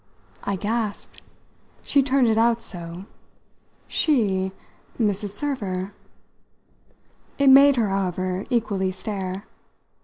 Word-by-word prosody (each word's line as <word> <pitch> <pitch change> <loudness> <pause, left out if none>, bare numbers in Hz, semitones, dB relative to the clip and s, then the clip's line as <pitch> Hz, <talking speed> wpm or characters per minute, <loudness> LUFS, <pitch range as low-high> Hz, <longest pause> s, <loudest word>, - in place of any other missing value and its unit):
I 200 - -1
gasped 215 +1 -3 0.6
she 280 - +3
turned 265 -2 +2
it 220 - +3
out 230 +1 +3
so. 175 -4 -7 0.8
"She 200 -11 +1 0.5
Mrs. 205 -2 0
Server?" 200 -6 -3 1.4
It 280 -1 +5
made 280 +1 +8
her, 225 -5 +1
however, 185 -1 -1
equally 200 -5 0
stare. 190 0 -5
205 Hz, 95 wpm, -24 LUFS, 190-235 Hz, 1.4 s, made